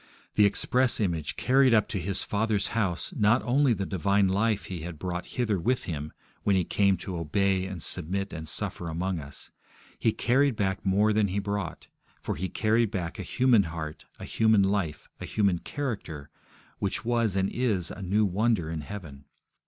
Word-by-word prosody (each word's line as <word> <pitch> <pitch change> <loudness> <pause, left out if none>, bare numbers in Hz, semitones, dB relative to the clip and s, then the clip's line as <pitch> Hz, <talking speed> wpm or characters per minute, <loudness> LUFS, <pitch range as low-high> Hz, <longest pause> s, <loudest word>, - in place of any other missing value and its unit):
The 105 -1 +5
Express 125 +4 +1
Image 85 -8 -1
carried 130 -1 +4
up 105 -2 +3
to 100 - -2
His 95 +2 -1
Father's 105 -1 0
House, 105 - 0
not 110 0 +3
only 135 +2 +3
the 100 -4 0
divine 100 +2 +2
life 100 0 +1
He 90 -1 -5
had 80 0 -7
brought 90 +2 -4
hither 110 -6 +1
with 125 +8 0
Him 75 -3 -5 0.3
when 100 - +2
He 95 - +3
came 100 +2 +2
to 90 +1 -5
obey 95 +4 +1
and 95 -4 -6
submit 95 +3 -2
and 80 -1 -6
suffer 85 +2 -3
among 90 +2 -2
us; 70 -1 -9 0.5
He 110 - +3
carried 130 +4 +2
back 95 -3 -1
more 105 +3 +3
than 105 -1 +3
He 95 +1 -3
brought, 100 0 -3 0.3
for - - -3
He 95 +4 -3
carried 110 +1 +2
back 90 -3 -4
a - - -2
human 120 +4 +3
heart, 80 -2 -6
a - - -8
human 110 -3 +3
life, 95 -6 -1
a - - -5
human 100 -5 +1
character, 100 - -5 0.5
which 100 +2 -2
was 115 -4 +1
and 95 0 +1
is 105 -9 0
a 100 - -8
new 100 +3 +2
wonder 100 -3 +1
in 80 -2 -3
heaven. 75 -6 -9
100 Hz, 185 wpm, -28 LUFS, 90-110 Hz, 0.5 s, The